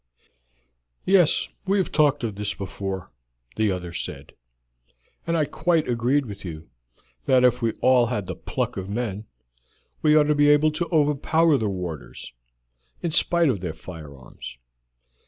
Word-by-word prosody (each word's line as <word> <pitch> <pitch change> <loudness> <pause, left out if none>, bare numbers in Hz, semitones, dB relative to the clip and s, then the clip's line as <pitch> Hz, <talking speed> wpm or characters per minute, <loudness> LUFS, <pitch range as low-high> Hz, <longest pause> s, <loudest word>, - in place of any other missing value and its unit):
"Yes, 185 -4 +4 0.2
we 195 +1 +2
have 190 - 0
talked 145 -3 +2
of 110 -3 -2
this 105 +1 -3
before," 95 -2 -5 0.4
the 110 -2 +1
other 90 -2 -5
said, - - -6 0.9
"and 170 0 +1
I 155 - +2
quite 165 +2 0
agreed 125 +4 +1
with 100 -4 -9
you 80 -3 -8 0.5
that 130 -1 +4
if 125 0 +3
we 115 -1 0
all 125 -2 +4
had 105 -5 -2
the - - -5
pluck - - -3
of 95 0 -5
men 105 -1 -3 0.8
we 150 -1 +4
ought 155 - +6
to 150 0 +2
be 145 0 +4
able 150 +1 +5
to 170 +3 -3
overpower 155 +1 +3
the 110 -6 0
warders, 80 -13 -6 0.7
in 170 - -1
spite 170 +1 +3
of 110 -7 0
their 85 -3 -5
firearms. 75 -8 -10
120 Hz, 155 wpm, -24 LUFS, 95-150 Hz, 0.9 s, ought